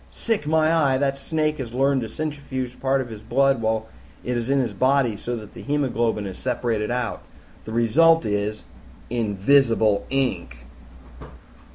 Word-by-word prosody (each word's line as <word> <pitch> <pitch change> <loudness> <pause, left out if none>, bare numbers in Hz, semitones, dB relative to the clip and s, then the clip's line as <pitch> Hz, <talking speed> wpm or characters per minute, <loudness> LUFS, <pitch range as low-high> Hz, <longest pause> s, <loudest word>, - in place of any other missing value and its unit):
"Sick, 220 -10 -2
my 160 0 +3
eye! 140 -5 +3
That 135 0 0
snake 155 +2 -1
has 120 -2 -6
learned 135 0 +2
to 115 - -5
centrifuge 135 -3 -5
part 135 0 +1
of 125 - -6
his 110 -2 -9
blood 135 +3 +2
while 110 0 0 0.4
it 125 - -2
is 120 +1 -2
in 140 0 +3
his 120 -5 -1
body, 130 +1 +2
so 120 +4 -4
that 105 -3 -9
the - - -10
hemoglobin 120 -7 0
is 95 -2 -7
separated 115 -4 -1
out. 120 -1 -2 0.4
The 110 - -7
result 160 +9 +4
is 105 0 -2 0.5
invisible 110 -1 +2
ink!" 95 - -2
125 Hz, 160 wpm, -23 LUFS, 110-140 Hz, 0.5 s, result